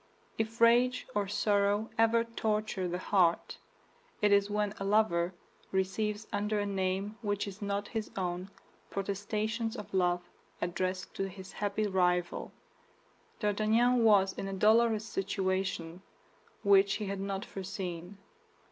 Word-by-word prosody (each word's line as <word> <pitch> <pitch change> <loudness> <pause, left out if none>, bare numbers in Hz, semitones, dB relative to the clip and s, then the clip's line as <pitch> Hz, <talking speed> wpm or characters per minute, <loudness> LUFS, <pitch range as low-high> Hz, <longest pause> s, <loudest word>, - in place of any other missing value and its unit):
If 225 +1 -2
rage 240 +2 +4
or 205 -1 0
sorrow 205 +1 +1
ever 225 +1 +4
torture 215 -4 -1
the 175 0 -2
heart, 180 -2 +1 0.6
it 210 -1 +3
is 200 0 +4
when 210 0 0
a - - -3
lover 195 -4 +2 0.4
receives 210 +3 -1
under 210 +1 0
a 205 - 0
name 195 +2 -2
which 205 -1 -1
is 200 +2 -8
not 200 0 -2
his 220 -2 -3
own 180 0 -2 0.4
protestations 215 +4 -2
of 210 - -8
love 175 -1 +1 0.3
addressed 185 +1 -2
to 195 0 -1
his 190 0 -10
happy 205 +1 -1
rival. 180 -3 0 0.9
D'Artagnan 225 +4 +3
was 195 -3 +5
in 195 - -5
a 195 - -4
dolorous 220 +2 +4
situation 190 -4 -2 0.6
which 200 -1 +5
he 210 - -3
had 195 0 -3
not 195 0 -3
foreseen. 185 -1 -6
200 Hz, 130 wpm, -31 LUFS, 190-215 Hz, 0.9 s, was